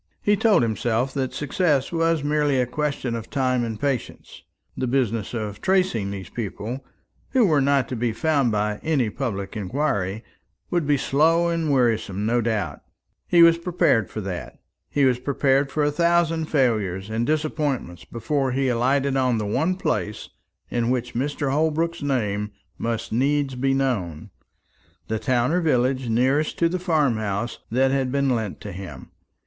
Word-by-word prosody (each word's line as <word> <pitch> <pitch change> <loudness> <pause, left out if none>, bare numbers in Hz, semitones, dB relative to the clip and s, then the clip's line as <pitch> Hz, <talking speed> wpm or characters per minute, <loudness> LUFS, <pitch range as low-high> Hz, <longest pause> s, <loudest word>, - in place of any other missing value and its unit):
He 205 - +4
told 205 - +4
himself 115 +3 0
that 130 -2 -1
success 145 -1 0
was 165 -2 +1
merely 145 -2 +1
a 125 - +2
question 140 -1 -2
of 115 -1 -5
time 130 -3 +1
and 110 -2 -4
patience. 135 -3 -3 0.3
The 130 - -2
business 120 -4 0
of 105 -3 -4
tracing 185 - +1
these 95 -3 -6
people, 115 +3 -5 0.5
who 255 -4 +5
were 155 -6 +3
not 140 -2 +2
to 130 - -3
be 120 0 0
found 140 +1 +1
by 105 0 -1
any 135 -9 +1
public 100 -7 -4
inquiry, 105 -2 -1 0.5
would 175 -4 0
be 145 -1 +3
slow 165 +6 +3
and 165 -2 -1
wearisome 115 -6 +1
no 120 +2 +2
doubt. 105 -10 -2 0.5
He 170 -1 +6
was 170 0 +6
prepared 170 - +2
for 110 - -5
that. 95 -3 -6 0.3
He 140 -1 +2
was 125 -2 +2
prepared 135 +1 +1
for 155 - 0
a 145 - +2
thousand 170 0 +2
failures 110 - 0
and 110 +1 0
disappointments 150 - -1
before 135 +2 -2
he 135 0 +1
alighted 135 +3 +1
on 130 -3 +2
the 105 - -2
one 155 - 0
place 105 - -2 0.4
in 120 -1 0
which 125 -1 -1
Mr. 140 +2 -1
Holbrook's 160 +3 0
name 105 -7 -1 0.3
must 115 -1 -3
needs 140 +3 +1
be 135 +2 +1
known, 100 - -2 0.8
the 110 0 -1
town 120 +3 +1
or 180 +2 +2
village 130 -4 +1
nearest 130 +6 +1
to 170 - +3
the 185 +2 -2
farm 155 - +1
house 105 +2 -3
that 130 +3 +2
had 135 -2 0
been 140 -1 +1
lent 110 -5 -2
to 105 - -6
him. 90 -8 -9
130 Hz, 165 wpm, -23 LUFS, 110-150 Hz, 0.8 s, He